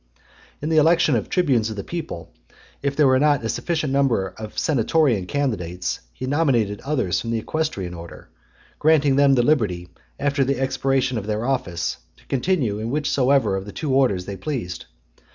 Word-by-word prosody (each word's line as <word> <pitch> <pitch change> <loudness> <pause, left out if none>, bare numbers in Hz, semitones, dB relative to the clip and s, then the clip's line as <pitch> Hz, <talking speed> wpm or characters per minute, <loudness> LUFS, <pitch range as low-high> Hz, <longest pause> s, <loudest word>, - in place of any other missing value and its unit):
XL. - - -37 0.4
In 150 - -1
the 160 - +2
election 160 -2 +4
of 110 - -2
tribunes 130 -11 +2
of 110 - -5
the 100 - -5
people, 160 - -6 0.5
if 140 0 -1
there 150 -1 +4
was 130 0 +4
not 145 -5 +3
a - - -1
sufficient 155 -3 -1
number 125 -9 +2
of 110 +3 -9
senatorian 130 - +2
candidates, 90 -11 -2
he 130 - -6
nominated 130 -8 +1
others 130 -11 0
from 115 - -5
the 115 - 0
equestrian 110 - -3
order; 85 -6 -10 0.5
granting 150 -3 +4
them 140 -1 +5
the 120 - +3
liberty, 105 - +1 0.3
after 140 0 +1
the 135 0 -1
expiration 135 -2 0
of 100 - -8
their 110 +2 -1
office, 95 -11 -1 0.2
to - - -23
continue 130 - 0
in 110 +1 -3
whichsoever 140 -4 +2
of 95 0 -4
the - - -6
two 145 +2 -3
orders 120 -9 +2
they 100 - -5
pleased. 115 - -4
130 Hz, 180 wpm, -22 LUFS, 105-145 Hz, 0.5 s, them